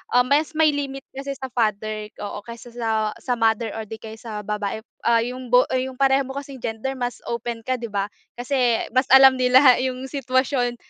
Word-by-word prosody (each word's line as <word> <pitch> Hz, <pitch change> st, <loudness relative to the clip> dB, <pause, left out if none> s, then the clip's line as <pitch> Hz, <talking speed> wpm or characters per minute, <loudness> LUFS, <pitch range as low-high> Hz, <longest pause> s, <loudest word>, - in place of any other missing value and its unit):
um, 245 Hz, 0 st, +5 dB
mas 290 Hz, +3 st, +2 dB
may 310 Hz, -1 st, +5 dB
limit 275 Hz, -1 st, -4 dB
kasi 275 Hz, +1 st, -5 dB
sa 265 Hz, -, -5 dB
father 215 Hz, -2 st, -1 dB
oo 205 Hz, 0 st, -5 dB
kaysa 235 Hz, 0 st, -10 dB
sa 220 Hz, -2 st, -1 dB
sa 250 Hz, -, -1 dB
mother 225 Hz, 0 st, +1 dB
or 220 Hz, -, -4 dB
di 220 Hz, -, -5 dB
kaya 220 Hz, 0 st, -9 dB
sa 215 Hz, -3 st, -6 dB
babae, 210 Hz, 0 st, -3 dB, 0.3 s
ah, 230 Hz, -1 st, +5 dB
yung 250 Hz, +1 st, -6 dB
bo 250 Hz, +1 st, +7 dB
yung 260 Hz, 0 st, -2 dB
pareho 270 Hz, 0 st, +4 dB
mo 265 Hz, -, -7 dB
kasing 275 Hz, -2 st, -7 dB
gender 225 Hz, +4 st, -3 dB
mas 245 Hz, 0 st, -3 dB
open 235 Hz, -1 st, -4 dB
ka 255 Hz, 0 st, 0 dB
di 235 Hz, -, -5 dB
ba? 200 Hz, 0 st, -1 dB, 0.3 s
Kasi 245 Hz, -1 st, 0 dB
mas 255 Hz, +1 st, +3 dB
alam 265 Hz, 0 st, +9 dB
nila 255 Hz, 0 st, +6 dB
yung 255 Hz, 0 st, -3 dB
sitwasyon 260 Hz, -2 st, 0 dB
245 Hz, 200 wpm, -23 LUFS, 225-265 Hz, 0.3 s, alam